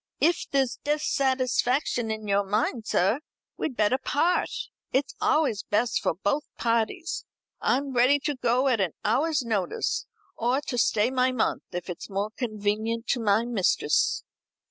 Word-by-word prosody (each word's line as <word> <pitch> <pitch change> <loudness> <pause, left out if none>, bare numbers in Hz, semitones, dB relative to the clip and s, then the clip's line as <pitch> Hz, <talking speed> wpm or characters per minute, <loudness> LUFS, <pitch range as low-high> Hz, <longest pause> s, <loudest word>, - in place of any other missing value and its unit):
"If 340 +2 +2
there's 270 -3 0
dissatisfaction 260 -4 +1
in 220 -1 -4
your 200 0 +2
mind, 215 +3 -1
sir, 195 +9 +2 0.4
we'd 260 - -3
better 215 +5 +2
part. 335 +7 +1 0.4
It's 270 +2 0
always 295 -10 +2
best 225 +3 0
for - - 0
both 205 - 0
parties. 235 +9 -1 0.4
I'm 275 +1 +1
ready 255 +4 +5
to 295 - -1
go 250 +1 +1
at 240 -6 +2
an 180 -5 0
hour's 290 +6 +2
notice, 205 -6 -1 0.3
or 245 +4 +1
to 275 -4 -4
stay 220 +2 +2
my 255 0 +2
month, 250 -3 -1
if 175 -1 -5
it's 180 +2 -6
more 200 +2 -2
convenient 220 0 -2
to 250 - +2
my 220 0 +2
mistress." 225 -7 +1
240 Hz, 145 wpm, -26 LUFS, 215-270 Hz, 0.4 s, ready